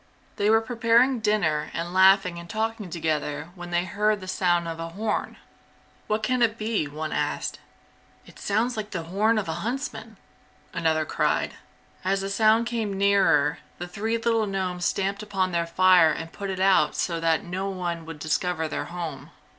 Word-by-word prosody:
They 205 +1 +2
were 225 +1 +5
preparing 235 +2 +3
dinner 190 -9 +1
and 170 +1 -3
laughing 190 -2 +5
and 170 0 -11
talking 220 -1 -2
together 155 -2 -2
when 175 -2 -9
they 175 0 0
heard 210 +3 +1
the 185 - -9
sound 175 -2 +1
of 165 0 -5
a 165 0 -4
horn. 210 +5 -3 0.7
"What 215 0 -1
can 255 +2 +1
it 225 -1 +2
be?" 215 -8 -1
one 155 +1 -5
asked. - - -2 0.7
"It - - -16
sounds 225 +5 0
like 215 -1 -4
the 175 -5 -4
horn 210 +7 +1
of 210 - -1
a 165 +1 -3
huntsman!" 260 +6 -4 0.6
another 160 -1 +1
cried. - - 0 0.5
As 195 +1 +1
the 195 0 -3
sound 220 +3 +4
came 225 -4 -2
nearer, 190 -7 +3 0.2
the 175 - -6
three 220 +5 -2
little 225 -1 +1
gnomes 185 -2 -2
stamped 195 +1 -1
upon 195 -3 -1
their 170 -1 0
fire 180 -1 +5
and 165 +1 -4
put 200 -1 -5
it 190 -1 -3
out 190 0 +4
so 170 -2 -1
that 165 +3 +1
no 190 +1 -3
one 175 -3 -3
would 165 -2 -7
discover 160 +2 -1
their - - -3
home. 170 -2 -6
190 Hz, 180 wpm, -25 LUFS, 170-215 Hz, 0.7 s, were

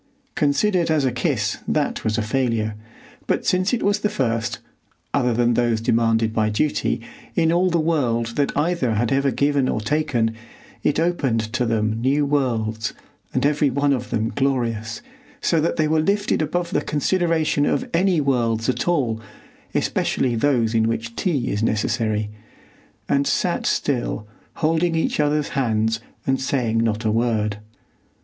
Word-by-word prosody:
Considered 165 +5 +1
as 155 -3 +2
a 130 - +2
kiss, 125 - -1
that 150 -2 0
was 110 0 0
a 115 - 0
failure, 115 -2 0 0.5
but - - 0
since 185 +1 +2
it 245 - 0
was 205 +1 +2
the 210 - 0
first, 115 - -1 0.6
other 125 -1 +2
than 120 +1 +2
those 120 -1 +1
demanded 115 0 +1
by 110 -1 +1
duty, 145 +8 0 0.4
in 165 -1 +3
all 180 +2 +3
the 170 -1 +1
world 120 -8 0
that 145 -1 +1
either 145 -7 +1
had 115 +2 0
ever 140 +1 +2
given 140 +1 +1
or - - 0
taken, 120 -2 0 0.5
it 150 - +1
opened 130 -10 0
to 125 -2 0
them 110 0 0
new 140 +4 +2
worlds, 115 -6 -1 0.4
and - - 0
every 145 0 +3
one 140 +2 +1
of 125 - -3
them 110 0 0
glorious, 120 - -1 0.4
so 165 -2 +1
that 165 - 0
they 155 -1 +1
were 155 +1 +2
lifted 200 +3 +1
above 170 +3 -1
the 150 - +1
consideration 160 -1 +1
of 255 - 0
any 180 0 +3
worlds 120 -5 +1
at 130 - -1
all, 125 -10 +1 0.5
especially 125 -2 0
those 115 -2 +1
in 110 -1 +3
which 115 0 -3
tea 150 -10 0
is 105 - -1
necessary, 110 -1 0 0.8
and 140 0 +1
sat 175 - 0
still, 120 -6 -1 0.3
holding 165 +1 +1
each 160 - 0
other's 150 0 +1
hands 115 -4 0 0.3
and 135 0 +1
saying 125 -4 0
not 115 0 0
a 110 - +2
word. 110 -2 0
130 Hz, 160 wpm, -22 LUFS, 115-155 Hz, 0.8 s, in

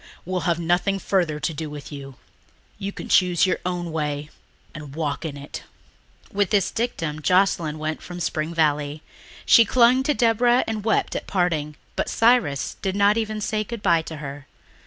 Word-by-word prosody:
We'll 185 +1 -1
have 170 0 +1
nothing 175 +4 +1
further 175 -6 0
to 150 +2 -2
do 155 0 -5
with 145 0 -9
you. 135 -2 -8 0.6
You 200 0 -3
can - - -8
choose 180 -2 +4
your 185 - 0
own 175 -2 -3
way 150 -1 -3 0.4
and 150 -2 -9
walk 150 -2 -2
in 145 -3 -5
it." 140 0 -8 0.7
With 200 -2 +1
this 200 -3 +2
dictum 165 -10 -3
Joscelyn 180 -3 +2
went 155 0 -3
from 180 0 -8
Spring 155 -1 -2
Valley. 150 -2 0 0.4
She 230 - +8
clung 245 +3 +4
to 290 +2 +1
Deborah 240 +1 +3
and 220 -2 -3
wept 220 0 +1
at - - -4
parting, 160 -5 0 0.2
but - - -1
Cyrus 225 - +2
did 190 0 -1
not 205 +1 +4
even 215 -1 -2
say 215 +1 -1
goodbye 205 -7 +1
to 160 0 -8
her. 140 -1 -8
175 Hz, 175 wpm, -23 LUFS, 150-205 Hz, 0.7 s, She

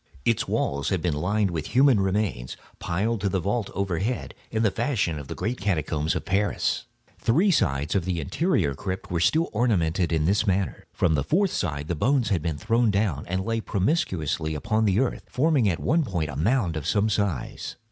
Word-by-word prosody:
Its - - +1
walls 70 0 -1
had 95 - 0
been 85 -1 0
lined 95 +6 0
with 80 -2 -3
human 135 -4 +6
remains, 95 - -1 0.2
piled 105 +5 -1
to 100 - +1
the 95 - 0
vault 100 +4 -1
overhead, 100 +5 -2 0.2
in 110 0 0
the 105 - +3
fashion 105 - -1
of 70 - -9
the - - -6
great 115 +7 -3
catacombs 80 -5 0
of - - -3
Paris. 100 +1 0 0.3
Three 170 - +3
sides 75 - +1
of 95 - +1
this 90 -2 -1
interior 80 - 0
crypt 95 +7 -5
were 85 - 0
still 160 - +2
ornamented 95 -7 +1
in 80 -2 +1
this 100 +5 +2
manner. 95 0 -1
From 85 -3 +1
the 70 -3 +1
fourth 185 - +1 0.2
the 85 - -2
bones 125 - +1
had 95 -7 +1
been 80 -2 -2
thrown 115 +7 +2
down, 100 -8 0
and 95 +2 -2
lay 115 0 -1
promiscuously 90 - -1
upon 110 +9 0
the 100 0 +2
earth, 130 - -1
forming 135 -5 +2
at 85 - -1
one 165 +2 +2
point 85 - -2
a - - -7
mound 95 - +1
of 75 - -4
some 105 0 +2
size. 100 - -2
95 Hz, 195 wpm, -25 LUFS, 80-115 Hz, 0.3 s, human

